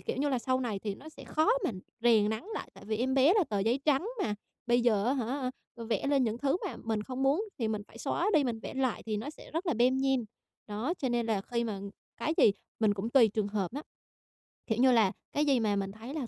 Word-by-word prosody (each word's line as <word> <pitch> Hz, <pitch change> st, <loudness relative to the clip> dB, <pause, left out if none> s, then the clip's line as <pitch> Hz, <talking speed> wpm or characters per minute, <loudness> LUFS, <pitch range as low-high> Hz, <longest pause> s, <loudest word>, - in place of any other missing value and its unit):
kiểu -, -, -3 dB
như 290 Hz, +2 st, +1 dB
là, 260 Hz, -, +1 dB
sau 255 Hz, +2 st, 0 dB
này 220 Hz, -6 st, -2 dB
thì 205 Hz, 0 st, -4 dB
nó 280 Hz, +9 st, -12 dB
sẽ 315 Hz, -, -12 dB
khó 315 Hz, +6 st, +1 dB, 0.2 s
mà -, -, +2 dB, 0.3 s
rèn 225 Hz, -3 st, +4 dB
nắn 220 Hz, +7 st, -3 dB
lại. -, -, -5 dB
Tại -, -, -13 dB
vì 215 Hz, +1 st, -1 dB
em 260 Hz, +4 st, 0 dB
bé 275 Hz, +8 st, +5 dB
là 410 Hz, -, +4 dB
tờ 205 Hz, -, 0 dB
giấy 230 Hz, +7 st, +1 dB
trắng 300 Hz, +6 st, +2 dB, 0.2 s
mà, 210 Hz, -, -1 dB, 0.3 s
bây 240 Hz, +1 st, +4 dB
giờ 215 Hz, -4 st, +3 dB
á 255 Hz, -, +3 dB
hả 255 Hz, +1 st, -2 dB, 0.3 s
vẽ 230 Hz, +3 st, -2 dB
lên 280 Hz, -3 st, +3 dB
những 225 Hz, 0 st, -1 dB
thứ 280 Hz, +5 st, +1 dB
mà -, -, -5 dB
mình 220 Hz, -2 st, -1 dB
không 260 Hz, +3 st, -4 dB
muốn 290 Hz, +10 st, +3 dB
thì 225 Hz, -3 st, 0 dB
mình 215 Hz, -1 st, -2 dB
phải -, -, -14 dB
xóa 425 Hz, -, 0 dB
đi, 295 Hz, -, +5 dB
mình 230 Hz, -3 st, -2 dB
vẽ -, -, -7 dB
lại 260 Hz, -3 st, 0 dB
thì 215 Hz, -1 st, -1 dB
nó 250 Hz, +8 st, -4 dB
sẽ -, -, -14 dB
rất 330 Hz, +4 st, -3 dB
là 330 Hz, -, +2 dB
lem 250 Hz, +3 st, +3 dB
nhem. 265 Hz, -3 st, +1 dB, 0.4 s
Đó, 220 Hz, +11 st, -2 dB
cho 265 Hz, -, -1 dB
nên 240 Hz, -1 st, 0 dB
là 215 Hz, -4 st, +1 dB
khi 235 Hz, +1 st, -2 dB
mà 210 Hz, -4 st, -3 dB, 0.4 s
cái 315 Hz, -, -1 dB
gì 205 Hz, -, +7 dB, 0.3 s
mình 210 Hz, -2 st, +3 dB
cũng 205 Hz, +4 st, -3 dB
tùy 240 Hz, -5 st, +6 dB
trường 205 Hz, 0 st, -1 dB
hợp 200 Hz, -1 st, -2 dB
á. 290 Hz, -, -4 dB, 0.9 s
Kiểu 220 Hz, -, 0 dB
như 260 Hz, 0 st, +6 dB
là, 220 Hz, -5 st, +4 dB, 0.2 s
cái 295 Hz, -, +2 dB
gì 275 Hz, -4 st, +3 dB
mà 210 Hz, -2 st, +1 dB
mình 195 Hz, -1 st, -2 dB
thấy 225 Hz, +6 st, -9 dB
là 290 Hz, -6 st, -3 dB
240 Hz, 265 wpm, -30 LUFS, 215-270 Hz, 0.9 s, gì